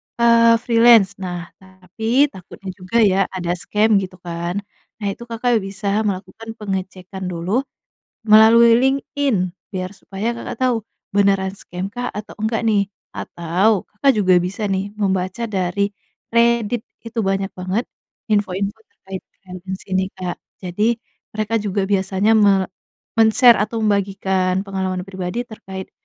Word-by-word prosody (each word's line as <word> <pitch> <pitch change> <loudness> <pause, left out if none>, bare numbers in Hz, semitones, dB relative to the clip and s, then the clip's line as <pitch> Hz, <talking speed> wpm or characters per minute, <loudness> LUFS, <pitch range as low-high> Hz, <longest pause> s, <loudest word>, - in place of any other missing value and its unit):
eee, 230 0 +5
freelance. 230 -4 +6
Nah, 175 -2 -5
tapi 215 +9 0
takutnya 190 -1 -9
juga 185 +4 -3
ya 195 -2 +3
ada 175 -2 -2
scam 210 +2 +2
gitu 185 -1 -6
kan. 175 +3 -3 0.4
Nah - - 0
itu, 235 - -8
Kakak 235 0 +1
bisa 200 +2 -2
melakukan 200 +4 -5
pengecekan 190 -2 -5
dulu, 180 +8 -1 0.6
melalui 230 +2 +7
LinkedIn 265 -6 0 0.2
biar 185 -1 -4
supaya 200 +3 -4
Kakak 235 - -7
tahu, 250 -2 +3 0.4
beneran 195 -1 +3
scam 180 -1 -6
kah 245 +3 -4
atau 210 0 -8
enggak 220 +1 -1
nih? 205 -3 +3 0.3
Atau 180 +5 0
Kakak 275 +6 +3
juga 185 -3 +4
bisa 195 +4 -3
nih 195 +1 -1
membaca 190 +1 -1
dari 195 +1 0 0.4
Reddit 235 -1 +3 0.2
itu 230 +1 -6
banyak 195 0 0
banget 185 +5 -1 0.5
info-info 200 0 0
terkait 190 -1 -9 0.2
freelance 185 0 -7
ini, 190 0 +1
Kak. 180 -2 -4 0.3
Jadi 210 +6 0 0.4
mereka 215 +1 -2
juga 205 -1 -1
biasanya 195 +1 +1
me 200 -3 +4 0.5
men-share 225 +2 +6
atau 215 +2 -1
membagikan 190 -2 +1
pengalaman 190 -2 -2
pribadi 190 +4 -4
terkait, 190 -5 -9
200 Hz, 130 wpm, -20 LUFS, 185-225 Hz, 0.6 s, melalui